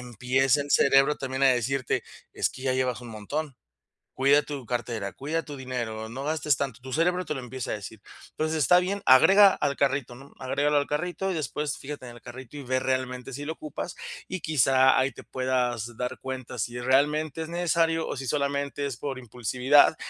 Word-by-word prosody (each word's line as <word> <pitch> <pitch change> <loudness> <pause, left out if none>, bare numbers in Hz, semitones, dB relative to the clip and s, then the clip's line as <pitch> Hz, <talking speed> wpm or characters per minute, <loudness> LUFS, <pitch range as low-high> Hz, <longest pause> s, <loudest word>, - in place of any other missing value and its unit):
empieza 125 +4 +1
el 145 0 -5
cerebro 135 +2 +5
también 135 0 -1
a - - +8
decirte: 130 +1 0 0.3
"Es - - 0
que 130 - -11
ya 130 -1 +1
llevas 130 -2 0
un 120 - -10
montón, 130 +7 -5 0.6
cuida 140 +2 +4
tu 145 -4 -7
cartera, 115 -4 -3
cuida 160 +4 -3
tu 145 - -8
dinero, 115 -4 -4
no 130 +4 -6
gastes 150 -1 +1
tanto". 130 -4 -4
Tu 130 +1 -9
cerebro 180 +4 +2
te 150 - -2
lo 135 - -4
empieza 125 0 -5
a - - 0
decir. 105 0 -9 0.3
Entonces, 155 +1 -1
está 180 +4 +5
bien, 195 +3 -2
agrega 195 +10 +7
al 140 -1 -1
carrito, 135 -3 0
¿no? 135 +3 -14
Agrégalo 145 +3 0
al 145 - +1
carrito 180 +5 -2
y - - -1
después 150 -1 -3
fíjate 140 -2 -8
en 120 - -11
el - - -17
carrito 130 +3 -10
y 145 - -7
ve 130 0 0
realmente 130 0 -2
si 145 +2 -6
lo 160 - -3
ocupas. 155 +2 -6 0.3
Y 185 -2 -5
quizá 130 -3 +4
ahí 135 +1 +1
te - - -11
puedas 125 -3 -1
dar 125 0 -4
cuenta 130 -2 -6
si 120 +2 -3
realmente 150 +4 +1
es 160 - -7
necesario 165 -1 +1
o - - -4
si 135 0 -5
solamente 140 0 -1
es 130 -4 -4
por 135 -2 -4
impulsividad, 125 +5 +3
135 Hz, 200 wpm, -27 LUFS, 125-150 Hz, 0.6 s, a